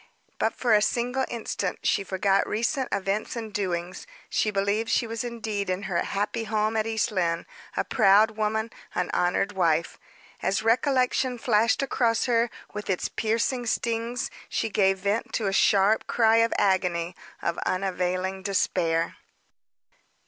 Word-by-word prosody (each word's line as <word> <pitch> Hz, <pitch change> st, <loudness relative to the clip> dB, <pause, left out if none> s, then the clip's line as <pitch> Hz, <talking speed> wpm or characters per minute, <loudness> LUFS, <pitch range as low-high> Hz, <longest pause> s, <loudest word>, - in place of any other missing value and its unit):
But, -, -, 0 dB
for 240 Hz, -3 st, +2 dB
a 210 Hz, -, +5 dB
single 250 Hz, +4 st, 0 dB
instant, 215 Hz, -5 st, -3 dB
she 200 Hz, -, +2 dB
forgot 195 Hz, +1 st, +1 dB
recent 250 Hz, +5 st, -1 dB
events 200 Hz, +5 st, -1 dB
and 225 Hz, -3 st, -6 dB
doings, 180 Hz, -, -3 dB, 0.2 s
she 215 Hz, -, +1 dB
believed 205 Hz, +2 st, 0 dB
she -, -, +2 dB
was 230 Hz, 0 st, -4 dB
indeed 220 Hz, -5 st, -3 dB
in 185 Hz, +2 st, -2 dB
her 185 Hz, -4 st, -1 dB
happy 210 Hz, +3 st, -2 dB
home 215 Hz, 0 st, 0 dB
at 220 Hz, 0 st, 0 dB
East 225 Hz, +1 st, 0 dB
Lynne, 170 Hz, -4 st, 0 dB, 0.3 s
a -, -, +2 dB
proud 205 Hz, +3 st, +4 dB
woman, 220 Hz, +1 st, -1 dB, 0.2 s
an 180 Hz, -, -1 dB
honored 180 Hz, +3 st, +1 dB
wife. 170 Hz, -4 st, 0 dB, 0.4 s
As 200 Hz, -, 0 dB
recollection 250 Hz, +1 st, +2 dB
flashed 225 Hz, +2 st, +2 dB
across 235 Hz, -4 st, +1 dB
her, 235 Hz, -1 st, +2 dB, 0.2 s
with 210 Hz, 0 st, -6 dB
its 185 Hz, -, 0 dB
piercing 230 Hz, +2 st, -1 dB
stings, 230 Hz, +2 st, -1 dB, 0.2 s
she 225 Hz, -, -1 dB
gave 195 Hz, -1 st, +3 dB
vent 200 Hz, +3 st, -2 dB
to 220 Hz, -, -1 dB
a 195 Hz, -, 0 dB
sharp 200 Hz, +2 st, +3 dB
cry 225 Hz, -1 st, +4 dB
of 230 Hz, 0 st, +3 dB
agony, 180 Hz, -3 st, +1 dB, 0.2 s
of 170 Hz, -, -2 dB
unavailing 185 Hz, 0 st, -1 dB
despair. 175 Hz, -4 st, 0 dB
210 Hz, 150 wpm, -26 LUFS, 190-230 Hz, 0.4 s, a